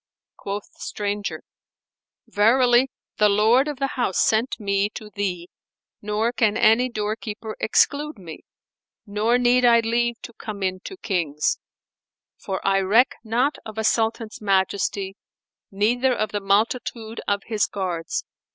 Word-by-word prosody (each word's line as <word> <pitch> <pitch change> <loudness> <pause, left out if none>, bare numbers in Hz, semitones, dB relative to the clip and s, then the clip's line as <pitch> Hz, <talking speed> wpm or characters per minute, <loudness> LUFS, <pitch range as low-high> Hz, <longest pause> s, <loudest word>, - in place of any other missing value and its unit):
Quoth 200 +1 -5
the - - -27
stranger, 205 0 -3 0.8
"Verily 245 +4 +4 0.3
the 210 0 +5
Lord 220 +7 +4
of 295 -2 -4
the 275 - 0 0.2
House 190 -6 0
sent 225 +4 +2
me 200 -1 0
to 210 -1 -8
thee, 185 -4 -3 0.5
nor 210 +3 0
can 220 -3 +2
any 235 +4 +4
doorkeeper 215 0 -4
exclude 295 +6 +1
me, 170 -5 -9 0.7
nor 215 +3 +1
need 250 0 +3
I 235 -1 +6
leave 235 +1 0
to 235 - -9
come 210 -3 -7
in 185 0 -1
to 385 - -7
Kings; 170 - -1 0.8
for 190 -1 -5
I 195 0 +3
reck 210 +7 +4
not 245 +6 0
of 220 0 -9
a 220 - -1
Sultan's 225 0 0
majesty 195 0 0 0.5
neither 245 +6 +1
of 215 - -2
the 205 - -2
multitude 220 +2 -1
of 200 0 0
his 215 -3 0
guards. 185 - -3
215 Hz, 140 wpm, -23 LUFS, 200-235 Hz, 0.8 s, I